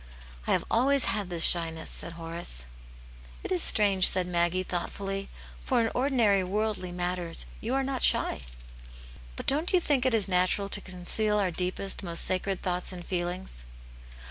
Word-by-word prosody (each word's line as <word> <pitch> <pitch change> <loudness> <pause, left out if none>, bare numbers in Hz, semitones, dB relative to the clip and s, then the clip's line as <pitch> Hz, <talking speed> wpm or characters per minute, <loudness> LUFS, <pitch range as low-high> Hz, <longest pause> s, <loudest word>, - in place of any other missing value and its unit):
'* - - -18
I - - +1
have - - 0
always 270 +3 +3
had 205 -3 -1
this 170 -2 -3
shyness," 165 -2 +1
said 170 - -6
Horace. 165 - -5 0.8
It - - -6
is 180 - +3
strange," 200 -3 +5
said 185 -1 +6
Maggie, 175 +1 0
thoughtfully. 195 +2 -4 0.2
" - - -18
For 255 -3 +1
in 225 -1 +1
ordinary 240 -7 +2
worldly 205 -1 -2
matters 175 -1 -1
you 240 +4 -2
are 270 - +1
not 265 -1 -3
shy." - - +2 0.5
" - - -18
But - - -7
don't 305 +6 +2
you 365 - +6
think 285 -6 +1
it 245 - +3
is 210 -3 +1
natural 185 +2 +1
to 205 - +2
conceal 200 +4 0
our 195 -3 +1
deepest, 185 +3 -3
most 170 -3 +1
sacred 185 +1 -1
thoughts 180 0 -2
and 175 -2 -8
feelings 175 - -4
185 Hz, 175 wpm, -28 LUFS, 175-210 Hz, 0.8 s, said